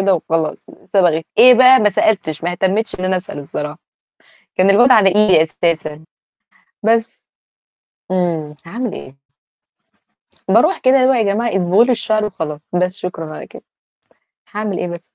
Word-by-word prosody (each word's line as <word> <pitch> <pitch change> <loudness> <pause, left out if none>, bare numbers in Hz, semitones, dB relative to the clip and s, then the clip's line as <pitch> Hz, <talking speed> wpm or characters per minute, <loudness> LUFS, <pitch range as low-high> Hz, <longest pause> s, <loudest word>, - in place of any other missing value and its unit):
كده 195 -1 +2
وخلاص، 160 -1 -3 0.3
صبغة 175 -5 +2 0.2
إيه 250 0 +8
بقى؟ 255 +1 +6
ما 210 -1 +2
سألتش. 190 -6 -1
ما 175 - -1
اهتمتش 195 +5 -1
إن 185 - -3
أنا 185 0 0
أسأل 180 -5 -7
الصراحة. 150 +2 -7 0.8
كان 185 +1 +2
الواد 240 +6 +5
على 210 -5 +5
إيدي 195 -5 +4
أساسًا، 160 -1 -3 0.8
بس. 225 +1 -1 0.9
إمم، 165 -5 -2
هاعمل 235 +5 -5
إيه؟! 130 +1 -11 1.3
باروح 240 - +3
كده 260 +1 +3
اللي 255 -1 +3
هو 265 - +4
يا 235 - +1
جماعة 215 +1 -1
اصبغوا 190 +5 +3
لي 250 - +1
الشعر 215 -2 -1
وخلاص، 160 -7 -5
بس 180 +2 0
شكرًا 165 -4 -7
على - - -9
كده. - - -14 0.9
هاعمل 210 -2 -4
إيه 180 - -3
بس. 170 0 -11
190 Hz, 155 wpm, -16 LUFS, 165-220 Hz, 1.3 s, إيه